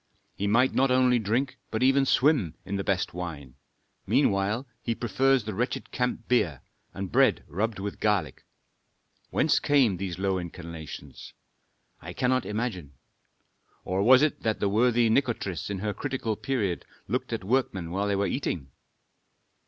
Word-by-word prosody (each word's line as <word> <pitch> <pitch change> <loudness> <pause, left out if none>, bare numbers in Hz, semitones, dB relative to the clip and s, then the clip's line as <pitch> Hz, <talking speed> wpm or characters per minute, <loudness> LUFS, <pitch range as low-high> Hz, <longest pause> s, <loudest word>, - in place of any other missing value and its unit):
He 100 - -2
might 120 +5 +3
not 135 +1 +3
only 125 -1 +4
drink 125 +5 -1
but 110 +3 -1
even 135 +1 +4
swim 130 - +3
in 100 - -3
the 100 - -1
best 95 -2 -1
wine; 80 -7 -6 0.5
meanwhile 100 +6 +2 0.2
he 115 - -2
prefers 130 +2 +2
the 110 0 -4
wretched 120 +6 -3
camp 125 -2 -2
beer, 85 - +1 0.3
and 95 -1 -6
bread 130 -4 +3
rubbed 110 +4 -2
with 100 +1 -5
garlic. 105 -7 0 0.9
Whence - - +2
came 130 -10 +3
these 90 -2 -4
low 95 -1 0
inclinations? 85 -2 -9 0.7
I - - -8
cannot 130 0 +1
imagine. 105 - -3 0.9
Or 95 +1 0
was 130 +6 +7
it 155 - 0
that 110 -1 -1
the 100 - +1
worthy 120 +2 +3
Nikotris 110 - 0
in 100 - -2
her 105 0 -1
critical 125 -2 -3
period 105 -9 -2 0.2
looked - - -2
at - - -3
workmen 95 -7 0
while 100 +3 -1
they 100 - +1
were 100 +1 +1
eating? 85 - -3
105 Hz, 150 wpm, -27 LUFS, 95-125 Hz, 0.9 s, was